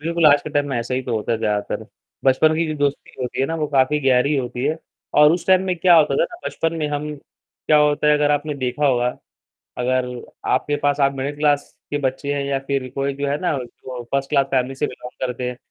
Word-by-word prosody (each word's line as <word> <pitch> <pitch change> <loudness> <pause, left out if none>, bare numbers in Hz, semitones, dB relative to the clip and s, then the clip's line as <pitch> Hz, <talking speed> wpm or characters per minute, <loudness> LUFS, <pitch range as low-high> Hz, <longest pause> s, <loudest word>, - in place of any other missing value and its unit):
बिल्कुल, 165 +1 +2
आज 145 -1 +6
के 155 - -6
टाइम 145 -1 +1
में 130 - -2
ऐसा 115 +2 -3
ही 130 - -1
तो 120 -2 -3
होता 110 +2 -2
है 110 - 0
ज़्यादातर, 105 -2 -2 0.4
बचपन 155 +4 +4
की 165 +1 0
जो 155 - -3
दोस्ती 145 -1 -1
होती 125 +1 -3
है 135 - +2
ना 165 - -3
वो 155 -1 -1
काफ़ी 135 +3 +3
गहरी 130 +3 +3
होती 125 -1 -3
है 155 +2 +1 0.5
और 150 +1 +7
उस 175 -1 -2
टाइम 185 0 +5
में 185 -1 0
क्या 180 -1 +6
होता 150 -3 +4
था - - +3
ना 350 - -9
बचपन 165 0 -1
में 155 - -1
हम 150 +1 -3
क्या 150 +2 -3
होता 150 0 +2
है 150 - +6
अगर 150 0 +2
आपने 145 0 0
देखा 130 +2 -1
होगा, 125 -2 +2 0.7
अगर 125 0 +1 0.5
आपके 145 +3 0
पास 145 0 +1
आप 140 0 +3
मिडिल 140 +2 -3
क्लास 145 -1 +2 0.3
के 145 - -1
बच्चे 140 +1 -2
हैं 140 - -2
या 140 -1 0
फिर 135 -2 -1
कोई 140 0 -1
जो 140 +1 -3
है 145 +2 0
ना 175 -5 0
जो 125 0 -8
फर्स्ट 140 0 0
क्लास 140 -2 +3
फैमिली 130 0 0
से 140 - -1
बिलॉन्ग 125 0 -6
करते 125 0 -4
हैं 125 - -6
140 Hz, 245 wpm, -21 LUFS, 130-150 Hz, 0.7 s, और